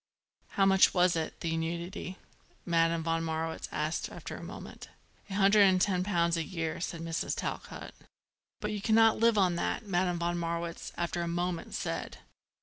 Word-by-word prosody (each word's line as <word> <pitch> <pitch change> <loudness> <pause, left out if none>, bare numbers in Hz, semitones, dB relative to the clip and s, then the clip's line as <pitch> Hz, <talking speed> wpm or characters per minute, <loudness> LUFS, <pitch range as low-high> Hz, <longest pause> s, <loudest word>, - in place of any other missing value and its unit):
"How 195 - +5
much 190 0 +5
was 180 -1 +4
it, 160 -1 -3
the 165 -1 -1
annuity?" 170 +3 -4 0.5
Madame 165 -1 +2
von 165 0 0
Marwitz 160 0 -3
asked 155 +2 -2
after - - -7
a - - -8
moment. - - -9 0.4
"A 195 - -4
hundred 200 +1 +5
and 185 -1 +4
ten 185 -1 +2
pounds 170 -3 +2
a 165 - 0
year," 165 -3 -3
said 170 -1 -4
Mrs. 165 0 -2
Talcott. - - -5 0.7
"But 210 - -2
you 210 -1 -3
cannot 225 +1 +4
live 230 -1 +4
on 185 -3 +4
that," 220 - -2
Madame 180 -2 +1
von 175 0 -1
Marwitz, 170 0 -3
after 175 0 -2
another 170 0 -2
moment, 175 -1 -2
said. - - -3
175 Hz, 170 wpm, -30 LUFS, 165-190 Hz, 0.7 s, How